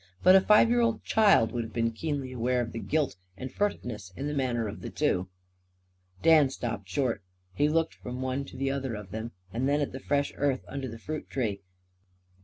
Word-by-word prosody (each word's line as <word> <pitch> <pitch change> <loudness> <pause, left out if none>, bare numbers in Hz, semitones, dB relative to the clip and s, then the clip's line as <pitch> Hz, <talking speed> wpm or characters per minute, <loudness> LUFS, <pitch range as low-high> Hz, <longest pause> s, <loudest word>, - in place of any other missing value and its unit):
But 185 - +8
a 190 - +8
five 210 +3 +6
year 240 0 +4
old 230 -2 +1
child 205 - +4
would 120 -2 -2
have 110 - -9
been 115 0 +1
keenly 140 +1 -3
aware 125 0 0
of 120 -2 -2
the 115 - -5
guilt 150 - 0 0.2
and 130 +5 -6
furtiveness 120 - -2
in 140 - -4
the 150 - -2
manner 125 -5 0
of 100 - -7
the - - -5
two. 90 +1 0 0.9
Dan 155 -4 +6
stopped 115 -7 -5
short. 120 +2 0 0.3
He 145 +10 +2
looked 165 +1 +1
from 125 +1 -7
one 130 +1 -1
to 130 - -11
the 135 +1 0
other 135 -4 -2
of 105 -3 -8
them; 110 +2 -5 0.2
then 135 +5 +1
at 145 - -1
the 130 - -6
fresh 140 +1 0
earth 140 -2 0
under 135 -1 -4
the 115 -1 -7
fruit 155 +6 -6
tree. 105 -7 -2
130 Hz, 205 wpm, -29 LUFS, 115-145 Hz, 0.9 s, But